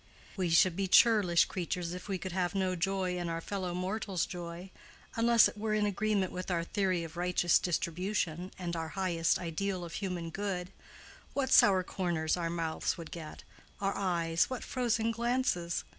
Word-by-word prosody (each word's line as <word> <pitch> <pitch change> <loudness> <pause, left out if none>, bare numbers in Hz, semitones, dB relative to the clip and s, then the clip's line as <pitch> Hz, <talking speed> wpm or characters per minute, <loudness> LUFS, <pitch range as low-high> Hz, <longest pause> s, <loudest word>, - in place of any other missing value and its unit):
We 185 -4 -1
should 170 +1 +5
be 195 +1 -1
churlish 190 -5 +5
creatures 175 -1 -3
if 180 +2 -7
we 195 -2 -1
could 185 +1 -6
have 180 +1 -1
no 185 -1 +1
joy 185 0 -1
in 175 -1 -3
our 165 0 -2
fellow 185 0 -4
mortals' 190 0 -1
joy, 175 +1 -7 0.4
unless 230 0 +6
it - - -9
were 215 0 0
in 210 -1 +2
agreement 205 -1 0
with 185 +1 -5
our 170 -2 0
theory 185 -1 0
of 165 +1 -9
righteous 175 -1 +3
distribution 180 0 -2
and 175 -2 -4
our 165 -1 -3
highest 170 -3 +1
ideal 180 +2 -3
of 170 - -9
human 180 -4 -4
good: 190 -1 -3 0.6
what 275 -2 0
sour 190 -2 +6
corners 170 -4 -1
our 170 -2 -2
mouths 165 +1 -2
would 165 -2 -8
get—our 175 +4 -6
eyes, 170 -3 +1
what 255 -2 -4
frozen 235 -3 0
glances! 235 -7 0
180 Hz, 170 wpm, -31 LUFS, 170-200 Hz, 0.6 s, unless